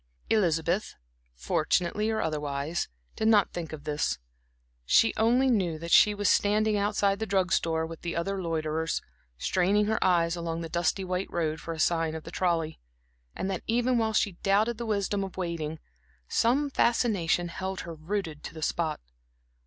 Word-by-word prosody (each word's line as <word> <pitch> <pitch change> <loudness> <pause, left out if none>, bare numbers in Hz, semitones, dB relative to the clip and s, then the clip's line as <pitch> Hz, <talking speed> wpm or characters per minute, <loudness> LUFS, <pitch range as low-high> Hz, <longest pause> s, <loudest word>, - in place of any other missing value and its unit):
Elizabeth, 175 -2 +1 0.4
fortunately 170 - 0
or 220 -1 0
otherwise, 150 +1 -2 0.3
did 220 - 0
not 210 -4 +4
think 170 -3 -5
of 155 -2 -8
this. 150 - -1 0.7
She 225 - +4
only 245 +4 +3
knew 190 -10 +1
that 170 +1 -7
she 210 0 +6
was 205 -1 0
standing 210 +2 +3
outside 200 -1 +1
the 220 - -2
drug 190 -2 +1
store 160 -1 +1
with 165 0 -9
the 170 - -4
other 190 +3 -2
loiterers, 160 -1 -1 0.3
straining 195 - +2
her 220 +1 0
eyes 170 -2 +3
along 170 -1 -3
the 165 - -5
dusty 170 +3 0
white 185 +1 -2
road 160 -2 -1
for 165 - -6
a 160 - -6
sight 165 -1 +1
of 160 - -6
the 165 - -9
trolley; 165 -3 -1 0.6
and - - -3
that, 185 - -3
even 240 +2 +2
while 220 -1 0
she 205 - +2
doubted 215 +4 +2
the 235 - -4
wisdom 200 -1 0
of 190 -1 -7
waiting, 165 -4 -3 0.5
some 275 +5 +2
fascination 195 -9 +1
held 190 +2 -4
her 170 - -7
rooted 160 -1 -4
to - - -8
the 160 - -6
spot. 160 0 -1
175 Hz, 170 wpm, -28 LUFS, 160-210 Hz, 0.7 s, she